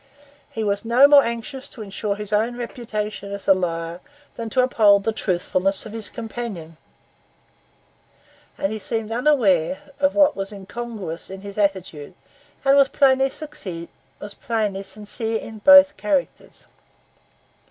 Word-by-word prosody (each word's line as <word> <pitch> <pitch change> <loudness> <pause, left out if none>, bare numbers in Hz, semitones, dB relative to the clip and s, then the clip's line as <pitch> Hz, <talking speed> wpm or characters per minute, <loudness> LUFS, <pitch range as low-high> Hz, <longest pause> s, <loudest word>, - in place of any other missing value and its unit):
He 225 - -4
was 200 -1 -1
no 240 +5 +6
more 285 -1 +7
anxious 235 +3 -5
to 225 - -9
insure 200 0 -3
his 210 0 -6
own 230 +3 +1
reputation 215 -4 -5
as 200 0 -7
a 195 - +7
liar 170 -2 -3 0.4
than 230 -1 -5
to 255 +3 +2
uphold 205 -5 +4
the 225 - 0
truthfulness 190 -1 -1
of 215 - -8
his 220 -2 -4
companion; 220 -9 -7 1.8
and 195 - -1
he 220 - -4
seemed 225 +1 -3
unaware 245 - +1
of 285 0 +2
what 300 -1 +4
was 195 0 -5
incongruous 205 -3 -7
in 190 0 -8
his 200 +1 -8
attitude, 185 -5 -2 0.5
and 275 +1 +5
was 275 -1 +5
plainly 270 -1 +3
sincere 205 - -7 1.5
in 220 0 -9
both 285 +4 +7
characters. 285 -4 -3
215 Hz, 130 wpm, -22 LUFS, 195-250 Hz, 1.8 s, more